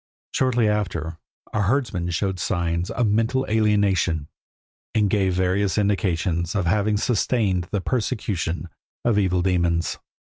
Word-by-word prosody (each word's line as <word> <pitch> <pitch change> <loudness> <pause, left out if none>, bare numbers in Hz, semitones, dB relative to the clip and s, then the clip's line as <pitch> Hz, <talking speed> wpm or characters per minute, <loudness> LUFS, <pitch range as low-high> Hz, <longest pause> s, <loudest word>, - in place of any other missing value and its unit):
Shortly 125 -4 +2
after 85 -6 -2 0.3
a 105 - +1
herdsman 100 -5 0
showed 95 +2 -1
signs 85 -1 -1
of 125 - 0
mental 115 +5 +1
alienation, 100 -8 +1 0.7
and 105 -3 +2
gave 95 -3 +2
various 95 +2 +1
indications 90 -4 0
of 100 -3 +1
having 105 +4 +2
sustained 105 -5 +1
the 100 - -1
persecution 95 -7 -2 0.4
of 115 -3 +3
evil 90 -3 +1
demons. 85 -2 +1
95 Hz, 120 wpm, -23 LUFS, 90-105 Hz, 0.7 s, of